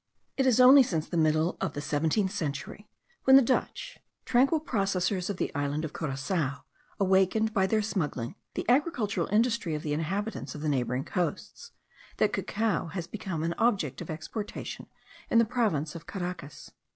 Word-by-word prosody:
It 265 -1 +2
is 255 -1 +4
only 260 +3 +9
since 165 -11 -1
the - - -5
middle 155 +1 +2
of 190 - -1
the - - -4
seventeenth 160 +7 0
century, 170 +3 -5 0.4
when 265 - +8
the 270 - +9
Dutch, 265 - -2 0.3
tranquil 270 +6 +3
possessors 195 - -1
of 200 - -3
the - - -2
island 145 +1 -1
of 155 - -7
Curacoa, 140 -1 -2 0.4
awakened, 195 +3 +2
by 190 -3 +2
their 215 +1 +1
smuggling, 150 - -2 0.2
the - - -3
agricultural 245 - +1
industry 220 -6 +1
of 150 - -5
the 150 - -2
inhabitants 195 +9 -3
of 150 - -7
the 155 - -1
neighbouring 130 -1 -1
coasts, 175 -2 -4 0.4
that - - +2
cacao 215 -4 -1
has 170 +1 -5
become 185 -4 -5
an 170 +1 0
object 190 - +1
of 170 - -8
exportation 200 +7 -6 0.4
in - - +3
the 230 - +6
province 205 - 0
of 170 -1 -10
Caracas. 180 -6 -6
185 Hz, 165 wpm, -28 LUFS, 155-220 Hz, 0.4 s, only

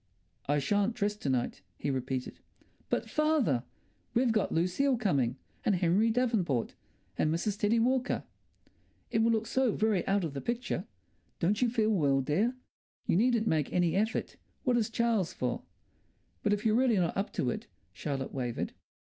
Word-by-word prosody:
"I 145 +1 +2
shan't 205 - +1
dress 210 -2 0
to 145 - -3
night," 125 -2 -1 0.2
he 140 - -1
repeated. 130 -1 -3 0.5
"But, - - 0
father, 295 - +2 0.5
we've 245 0 +3
got 215 -2 +1
Lucile 185 +11 +2
coming, 140 - +1 0.3
and 205 - +3
Henry 185 +5 +3
Davenport, 220 - +1 0.5
and 155 - +3
Mrs. 195 +5 -1
Teddie 210 +3 +3
Walker." 255 +3 +1 0.9
"It - - +2
will 230 - +4
look 220 -1 +1
so 255 0 +1
very 215 -4 +1
out 195 -1 +2
of 160 -4 -3
the 140 - -4
picture." 235 -6 -2 0.5
"Don't 205 +7 +1
you 245 - +4
feel 220 -2 +2
well, 145 -9 +3
dear?" 195 - +1 0.5
"You - - +2
needn't 230 +2 +3
make 155 -8 +1
any 175 -2 +2
effort. 220 +3 -1 0.3
What 250 -2 +2
is 230 -2 +1
Charles 225 -6 +1
for?" 125 -1 -2 0.8
"But - - +1
if 205 +1 0
you're 215 - +4
really 240 -2 +3
not 175 -2 +1
up 195 +1 -1
to - - 0
it," 220 +1 -6 0.3
Charlotte 135 -3 -4
wavered. 125 -3 -3
205 Hz, 165 wpm, -31 LUFS, 155-230 Hz, 0.9 s, will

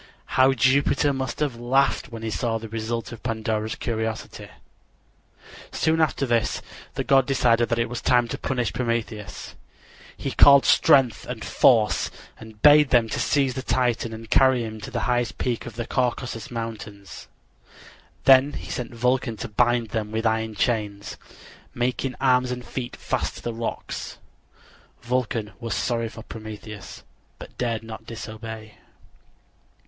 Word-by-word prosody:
How 130 +1 +5
Jupiter 140 +3 +3
must 130 0 -4
have 140 -6 -1
laughed 130 +4 +1
when 115 -1 -7
he 110 - -3
saw 115 0 -1
the 115 0 -8
result 115 +2 -4
of 115 - -9
Pandora's 110 -2 -2
curiosity! 110 -2 -4 1.2
Soon 160 0 +1
after 155 -3 +1
this 120 -3 0 0.3
the - - -1
god 135 -2 +4
decided 120 -4 +2
that 115 - +1
it 115 - +1
was 120 +1 -5
time 120 -1 +3
to - - -3
punish 125 -4 -1
Prometheus. 115 -3 -3 0.6
He - - -3
called 140 -1 +7
Strength 135 -7 +4
and - - -5
Force 110 -4 +3 0.3
and 110 -1 -12
bade 150 -1 +7
them 115 -3 +3
seize 135 +1 +1
the 130 - -4
Titan 120 -3 0
and 115 0 -8
carry 130 +1 +4
him 110 -1 -7
to - - -7
the - - -3
highest 120 -1 0
peak 120 -1 -2
of 115 - -9
the 120 0 -3
Caucasus 125 -2 -2
Mountains. 110 -4 -7 1.0
Then 135 +2 +6
he - - -7
sent 120 -1 -5
Vulcan 125 -1 0
to - - -5
bind 120 0 +1
him 105 -2 -2
with 110 +1 -2
iron 110 -1 0
chains, 105 -3 -1 0.6
making 125 +1 -1
arms 125 -1 +3
and 125 -1 -5
feet 125 -2 -5
fast - - -2
to - - -10
the 120 - -3
rocks. 115 0 -5 0.9
Vulcan 120 -3 -1
was 115 -5 -3
sorry 115 -2 -1
for 110 0 -11
Prometheus, 110 -3 -9 0.3
but - - -12
dared 115 -2 -1
not 110 0 -9
disobey. 110 -1 -8
115 Hz, 150 wpm, -24 LUFS, 110-125 Hz, 1.2 s, called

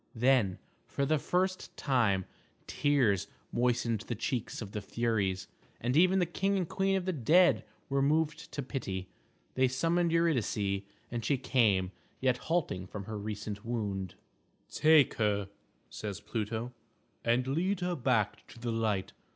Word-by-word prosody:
Then, 120 -5 +3 0.3
for 140 - -1
the 155 +2 +2
first 185 +4 -1
time, 110 -9 +2 0.4
tears 115 -10 +2 0.2
moistened 120 -2 +1
the 120 - -2
cheeks 120 +1 -3
of 100 -3 -6
the 105 - -4
Furies, 100 -4 -1 0.3
and 125 +3 -1
even 185 +4 +5
the 180 - +3
king 195 +4 0
and 180 -3 -1
queen 195 +2 +1
of 190 -2 -1
the 185 - 0
dead 170 +6 +4 0.2
were 140 0 +1
moved 155 +3 +1
to 145 - -3
pity. 95 -9 -4 0.4
They 130 0 +3
summoned 165 +6 +1
Eurydice, 115 -12 +1 0.3
and 120 -1 -3
she 135 +5 +2
came, 105 -8 +2 0.3
yet 130 -1 +2
halting 145 - 0
from 100 +2 -6
her 105 +1 -5
recent 105 0 -5
wound. 100 -6 -3 0.6
"Take 155 -3 +5
her," 100 -2 +1 0.4
says 105 -3 -6
Pluto, 110 +2 -3 0.5
"and 120 +2 +2
lead 175 +8 0
her 180 0 0
back 120 -7 0
to - - -14
the 120 0 -2
light. 110 -4 -1
120 Hz, 150 wpm, -31 LUFS, 105-155 Hz, 0.6 s, even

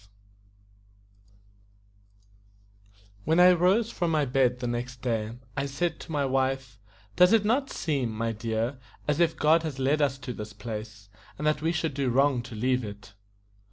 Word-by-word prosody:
WHEN 160 +8 +2
I 180 +1 +8
rose 185 +6 +3
from 175 - -1
my 155 -3 +2
bed 125 -1 +2
the 125 - -5
next 120 +1 -4
day, 115 -2 -2 0.2
I 140 - -1
said 150 +5 -2
to - - -10
my 145 -2 0
wife: 130 -3 -1 0.4
"Does 180 +3 +6
it 220 -2 +4
not 265 +6 +1
seem, 140 -7 -1
my 115 +1 -2
dear, 115 +3 -2 0.3
as 150 +1 +1
if 170 -1 +2
God 160 +2 +4
had 155 -5 -5
led 140 +3 +1
us 135 -2 +1
to 135 -2 -6
this 105 -1 -8
place, 105 -1 -8 0.3
and 150 - -4
that 150 -1 +1
we 160 +1 +1
should 160 -3 -1
do 135 -1 -1
wrong 135 0 +3
to 120 -1 -10
leave 125 +3 0
it?" 105 -1 -9
135 Hz, 165 wpm, -27 LUFS, 120-155 Hz, 0.4 s, I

